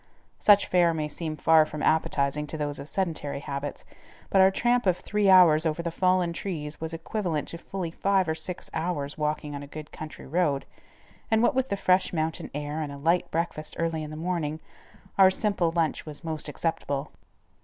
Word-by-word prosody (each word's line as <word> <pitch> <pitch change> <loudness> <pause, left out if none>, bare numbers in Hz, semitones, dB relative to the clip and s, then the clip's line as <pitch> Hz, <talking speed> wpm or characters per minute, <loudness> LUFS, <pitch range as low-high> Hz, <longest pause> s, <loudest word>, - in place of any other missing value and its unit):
Such 205 -1 +6
fare 175 -2 +3
may 155 -1 -1
seem 155 0 -5
far 160 +1 +5
from 155 -1 -6
appetizing 150 -2 +1
to 160 - -4
those 145 -1 -3
of 145 - -8
sedentary 165 -6 -2
habits, 140 0 -5 0.5
but 195 - +5
our 190 - +7
tramp 240 +3 +1
of 180 -1 +3
three 210 -1 0
hours 170 -5 +7
over 160 +1 -1
the 170 - -2
fallen 180 -1 +2
trees 155 -5 -5
was 160 0 -3
equivalent 165 -2 -3
to 170 - -6
fully 180 -2 -5
five 195 +1 +1
or 160 - +1
six 165 +3 -5
hours 160 -4 -2
walking 150 -1 -2
on 140 - -5
a 145 - -9
good 150 +1 -9
country 155 -1 -9
road, 150 -2 0 0.6
and 220 +1 +3
what 290 - +4
with 265 0 0
the 200 - -1
fresh 185 -1 +2
mountain 160 -1 -2
air 145 +1 -3
and 145 -2 -4
a 140 - -7
light 165 +5 +1
breakfast 160 -2 -3
early 165 -1 -1
in 155 - -6
the 155 - -7
morning, 160 -2 -2 0.6
our 190 -1 +9
simple 190 -3 +1
lunch 165 -2 0
was 150 -2 -9
most 160 -2 -1
acceptable. 145 -2 -2
160 Hz, 195 wpm, -27 LUFS, 150-180 Hz, 0.6 s, our